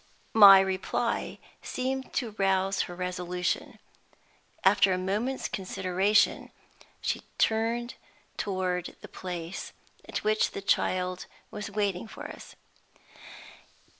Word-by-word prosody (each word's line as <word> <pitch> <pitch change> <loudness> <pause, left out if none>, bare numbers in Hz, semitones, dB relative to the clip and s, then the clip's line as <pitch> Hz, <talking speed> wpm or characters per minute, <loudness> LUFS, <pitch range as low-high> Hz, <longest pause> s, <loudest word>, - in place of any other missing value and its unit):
My 200 -3 +10
reply 190 -1 -1 0.2
seemed 265 +1 -3
to 240 -5 -1
rouse 195 0 +2
her 175 - -7
resolution. 180 -1 -3 0.9
After 195 0 +5
a 185 - +1
moment's 210 +8 -1
consideration, 190 +1 +1 0.5
she - - -1 0.2
turned 230 +2 +1 0.4
toward 185 -3 -2
the - - -9
place 175 -1 -6 0.4
at - - -3
which 215 +1 +2
the - - -5
child 185 -1 0 0.2
was 210 0 -5
waiting 200 -1 -1
for - - -9
us. - - -10
195 Hz, 105 wpm, -28 LUFS, 185-215 Hz, 0.9 s, My